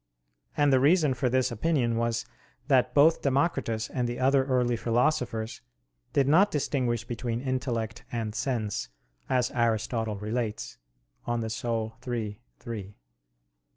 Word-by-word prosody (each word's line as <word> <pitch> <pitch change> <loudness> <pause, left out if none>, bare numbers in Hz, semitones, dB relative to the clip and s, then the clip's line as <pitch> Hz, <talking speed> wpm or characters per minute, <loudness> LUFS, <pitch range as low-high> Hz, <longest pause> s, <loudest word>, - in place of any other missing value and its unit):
And 145 -1 +4
the 130 - +5
reason 150 0 +4
for 125 0 0
this 130 0 +1
opinion 120 -1 +1
was 115 0 0 0.4
that 130 -3 +3
both 155 +3 +5
Democritus 135 -6 0
and 125 -2 -2
the 120 - -4
other 135 +1 +3
early 125 -2 +1
philosophers 120 -1 0 0.5
did 140 -2 +2
not 180 +8 +5
distinguish 125 -5 -1
between 120 0 -3
intellect 125 -4 -2
and 115 -3 -3
sense, 110 - -2 0.4
as 125 -1 +1
Aristotle 115 -2 0
relates 105 - -3 0.5
(De 120 - 0
Anima 115 -1 -2 0.2
iii, 110 -4 -3 0.2
3). 105 -4 -7
120 Hz, 125 wpm, -28 LUFS, 115-130 Hz, 0.5 s, the